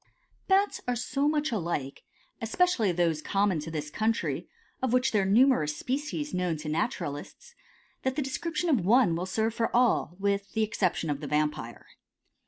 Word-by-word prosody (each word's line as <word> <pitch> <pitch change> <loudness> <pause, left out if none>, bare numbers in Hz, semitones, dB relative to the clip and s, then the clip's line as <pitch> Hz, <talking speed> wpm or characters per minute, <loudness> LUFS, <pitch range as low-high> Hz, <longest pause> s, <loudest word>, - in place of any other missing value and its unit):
Bats 395 +1 +2
are 245 - +1
so 275 +4 0
much 300 -1 0
alike, 170 - -3 0.4
especially 230 - +2
those 165 -3 +1
common 195 -1 +1
to 150 - -6
this 150 -2 -4
country, 220 +5 -1 0.3
of 260 -2 0
which 255 +1 +3
there 210 - +3
are - - 0
numerous 200 - +3
species 295 +3 -3
known 180 -3 0
to 150 0 -6
naturalists, 155 - -3 0.5
that 260 0 -1
the 300 - 0
description 320 +5 -2
of 265 - +2
one 210 -3 +4
will 180 +2 -3
serve 220 +3 0
for 230 0 0
all, 240 -7 +2
with 200 0 -1
the 220 - +1
exception 180 -6 0
of 140 - -2
the 150 - -6
Vampire. 150 0 -2
210 Hz, 170 wpm, -28 LUFS, 165-260 Hz, 0.5 s, one